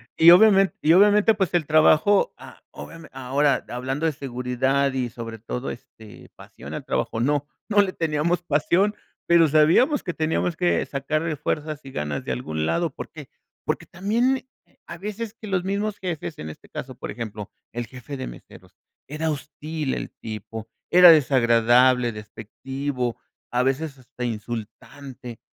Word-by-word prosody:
Y 165 +1 +7
obviamente 195 +1 +6
y 160 +2 +5
obviamente 210 +3 +5
pues 190 -4 -1
el 165 - +2
trabajo 155 - +4
a - - -14
obviame 165 -1 -11
ahora 135 +2 +1
hablando 130 +5 -3
de 160 - +2
seguridad 130 +1 -1
y 125 -2 -1
sobre 115 -1 -8
todo, 125 +3 -5
este, 110 -3 -13
pasión - - -10
al - - -6
trabajo 115 - -2
no 145 +4 0 0.2
no 205 -1 +4
le 190 -2 -1
teníamos 165 +2 0
pasión 175 +7 +1 0.3
pero 170 -1 +6
sabíamos 160 - +4
que 180 - -3
teníamos 160 +2 -1
que 175 +1 +1
sacarle 155 +3 -2
fuerzas 150 +1 -3
y 135 - -10
ganas 75 - -3
de - - -3
algún 80 +5 -3
lado 170 - 0
porque 150 0 -9 0.4
porque - - -2
también 235 +8 0 0.4
a 170 - -8
veces 210 +3 -5
que 220 -1 -11
los 190 -3 0
mismos 200 +2 -2
jefes, 170 -3 -5
en 80 - -6
este 80 - -13
caso, - - -7
por - - -7
ejemplo, 110 -3 -6 0.2
el 120 0 -5
jefe 130 +4 -9
de - - -5
meseros, - - -13 0.3
era 155 +2 -2
hostil 150 0 -4
el - - -5
tipo, 110 0 -8 0.2
era 180 0 +9
desagradable, 125 -3 +4
despectivo, 125 +4 -5 0.3
a 125 +1 +1
veces 135 +2 -1
hasta 125 -1 -7
insultante. 120 +2 -7
145 Hz, 155 wpm, -24 LUFS, 125-170 Hz, 0.4 s, era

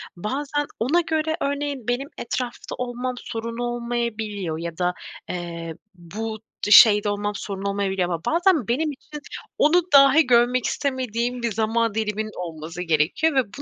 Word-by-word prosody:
bazen 280 +10 -2
ona 280 +10 +2
göre 315 -1 -1
örneğin 280 -3 -2
benim 245 +3 -1
etrafta 245 +1 -4
olmam 250 0 -3
sorun 230 -1 -5
olmayabiliyor 235 -7 -3
ya 170 -1 -5
da, 180 0 +1 0.4
eee, 170 -2 -5 0.2
bu 215 +5 -6 0.3
d 205 - -1
şeyde 210 0 +8
olmam 205 0 -2
sorun 195 -1 -5
olmayabiliyor 195 -2 0
ama 170 -2 -2
bazen 335 - +2
benim 300 +6 0
için 295 +2 -10 0.4
onu 340 +4 +5
dahi 275 +2 +7
görmek 245 0 +3
istemediğim 250 -2 -2
bir 235 - 0
zaman 225 +1 0
diliminin 215 0 -2
olması 165 0 -6
gerekiyor 170 - +1
ve 265 - +4
bu - - -6
230 Hz, 145 wpm, -23 LUFS, 200-265 Hz, 0.4 s, şeyde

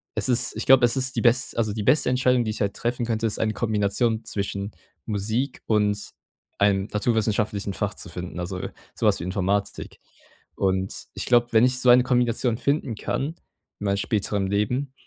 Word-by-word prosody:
es - - +1
ist 125 -1 +2
ich - - -4
glaube, 130 -2 +7
es 120 - +2
ist 130 0 0
die - - 0
bes 120 0 +2
also 110 -2 0
die 105 -1 -3
beste 130 +3 +3
Entscheidung, 125 -1 +2
die 110 - -1
ich 105 - -6
halt 100 -1 0
treffen 120 0 -2
könnte, 115 -1 -1
ist 105 - -3
eine 110 -1 0
Kombination 110 +1 0
zwischen 100 0 -4 0.3
Musik 110 +6 -2
und 105 -1 0 0.5
einem 100 -1 +2
naturwissenschaftlichen 105 -2 0
Fach - - -2
zu - - -8
finden, 90 0 -7
also 90 +1 -4 0.4
sowas - - +2
wie - - -5
Informatik. 100 +2 -2 0.6
Und 95 0 -1
ich - - -4
glaube, 120 -1 +4
wenn 110 +2 +6
ich 125 0 +1
so 125 - +3
eine 125 +1 +7
Kombination 120 -2 +1
finden 140 -2 -1
kann 135 +6 -2 0.5
in 105 - -5
meinem 100 0 +1
späteren 100 -2 -1
Leben, 125 +8 -1
110 Hz, 185 wpm, -24 LUFS, 100-125 Hz, 0.6 s, glaube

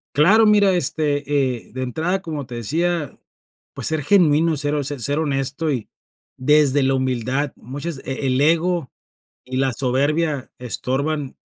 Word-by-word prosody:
Claro, 200 +10 +5
mira, 205 -2 +4
este, 150 -4 0 0.4
eh, - - -17
de 130 0 -4
entrada, 165 +9 -1
como 155 -6 -5
te 120 - -9
decía, 160 +6 -2 0.6
pues, - - +1
ser 160 -1 0
genuino, 160 -2 +3
ser 145 +1 +1
ho 145 - -1
ser 145 +1 -2
honesto, 140 +1 -1
y 125 -6 -3 0.5
desde 145 0 +3
la 135 0 +2
humildad, 130 +2 -1
muchas 145 +5 -6
e 135 - -7
e - - +1
el 130 +1 +1
ego 165 0 +2 0.5
y 130 0 -6
la 135 0 +1
soberbia 140 +4 0
estorban 135 +4 -2
145 Hz, 150 wpm, -21 LUFS, 130-160 Hz, 0.6 s, Claro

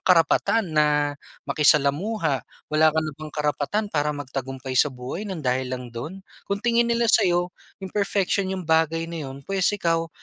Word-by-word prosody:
karapatan 180 +5 +3
na 150 -1 +3 0.3
makisalamuha, 150 - +2 0.3
wala 155 +1 +5
ka 155 - -1
na 155 - -4
bang 155 +2 -9
karapatan 150 +7 -1
para 150 -1 +1
magtagumpay 135 -1 -5
sa 130 +3 +4
buhay 130 +11 -6
ng 165 -7 -5
dahil 130 0 0
lang 125 -2 -9
don? 160 +11 -7 0.2
Kung 200 - 0
tingin 235 0 +3
nila 235 0 +2
sa'yo 175 0 +3 0.3
imperfection 200 -1 0
'yong 185 - -5
bagay 160 0 +2
na 165 -4 -5
'yon, 135 +1 -10
pwes, 195 -2 +1
ikaw 165 -3 0
155 Hz, 160 wpm, -24 LUFS, 140-185 Hz, 0.3 s, wala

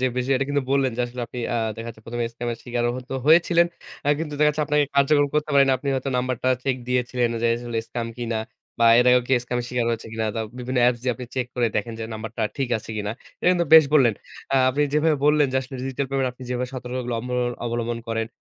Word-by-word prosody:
যে - - +1 0.3
এটা 135 - 0
কিন্তু 145 -1 +1
বললেন 135 -1 +2
যে - - -1
আসলে 120 +1 -7
আপনি 125 - -8 0.2
আ - - +1 0.2
দেখা 115 +1 -6
যাচ্ছে 110 -1 -11
১ম 120 +1 -5
এ - - 0
স্কামের 120 0 -4
স্বীকারও 120 -1 -1
হয়তো 130 0 -9 0.2
হয়েছিলেন। 170 +2 +5 0.4
আ - - +2
কিন্তু 155 -2 -4
দেখাচ্ছে 150 0 +3
আপনাকে 150 0 +3
কার্যক্রম 145 +1 +4
করতে 150 0 0
পারে 140 -1 +7
না। - - +5
আপনি 140 - -5
হয়তো 135 +1 -2
নাম্বারটা 130 0 -1 0.2
চেক 135 -2 +1
দিয়েছিলেন 125 -1 0
যে, - - +3
আসলে 120 -1 -4
স্কাম 120 -1 -3
কিনা 115 -2 -2 0.4
বা 115 - +6
এর 125 - +5
আগে 125 0 +6
কেউ 130 - +4
স্কামের 120 0 -2
স্বীকার 125 -2 -1
হয়েছে 115 -1 -3
কিনা? 110 -1 -2
দা 115 - -2 0.2
বিভিন্ন 125 +1 -2
অ্যাপস 120 0 +3
দিয়ে 125 -1 +1
আপনি 125 0 -8
চেক 130 -2 -1
করে 120 -2 +2
দেখেন 115 +3 -2
যে 110 - -4
নাম্বারটা 110 +1 -5
ঠিক 135 -3 -1
আছে 110 - -11
কিনা। 105 -1 -2 0.3
এটা - - +3
কিন্তু 175 -1 +1
বেশ 160 -1 +10
বললেন। 125 -7 +5 0.4
অ্যা 135 - +3
আপনি 140 +3 0
যেভাবে 150 +1 +3
বললেন 150 -1 +4
যে - - +4 0.2
ডিজিটাল 135 +1 -2
পেমেন্ট 135 -1 +1
আপনি 125 - -14
যেভাবে 125 0 -2
সতর্কগুলো 125 -1 -4
অব 120 - -8 0.4
অবলম্বন 120 0 -2
করেন 115 0 -1
125 Hz, 230 wpm, -23 LUFS, 120-140 Hz, 0.4 s, বেশ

